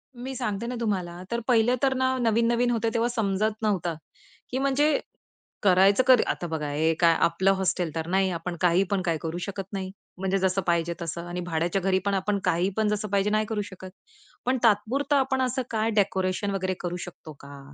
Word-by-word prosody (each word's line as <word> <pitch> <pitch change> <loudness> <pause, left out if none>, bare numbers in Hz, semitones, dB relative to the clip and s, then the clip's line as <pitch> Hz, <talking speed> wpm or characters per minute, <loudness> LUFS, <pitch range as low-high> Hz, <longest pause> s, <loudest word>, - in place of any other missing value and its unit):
मी 255 +2 -6
सांगते 215 0 -3
ना 250 - -3
तुम्हाला, 180 -6 -2
तर 235 - 0
पहिलं 240 0 +4
तर 270 -1 +4
ना 260 0 +1
नवीन-नवीन 235 +1 +2
होतं 230 -1 0
तेव्हा 235 0 +1
समजत 215 -2 0
नव्हतं 180 -6 0 0.6
की 255 - -1
म्हणजे, 275 +2 +2 0.6
करायचं 195 +5 +5
कधी? 255 -3 +7
आता 175 - -2
बघा 155 -2 -3
हे 160 +3 +1
काय 170 -1 +5
आपलं 185 +3 +3
हॉस्टेल 180 -3 0
तर 160 0 -3
नाही, 190 +1 +2
आपण 170 +1 -4
काही 180 +2 +4
पण 195 - +1
काय 165 -2 +1
करू 165 +1 -4
शकत 200 -1 -5
नाही, 190 -1 -4 0.3
म्हणजे 190 +1 0
जसं 190 +1 +1
पाहिजे 170 0 +1
तसं 170 +1 -4
आणि 180 +1 -4
भाड्याच्या 175 +2 -1
घरी 190 0 +2
पण 200 - +1
आपण 195 +1 0
काही 175 +3 +2
पण 220 - +2
जसं 210 0 -1
पाहिजे 200 +1 +1
नाही 215 +1 +1
करू 210 -2 -1
शकत. 190 -2 -10 0.6
पण 255 +1 +2
तात्पुरता 250 +7 +2
आपण 265 0 0
असं 255 +1 0
काय 220 0 0
डेकोरेशन 195 -1 0
वगैरे 185 -1 -1
करू 175 -1 -3
शकतो 160 -3 -11
का? 140 0 -11
195 Hz, 195 wpm, -26 LUFS, 175-230 Hz, 0.6 s, कधी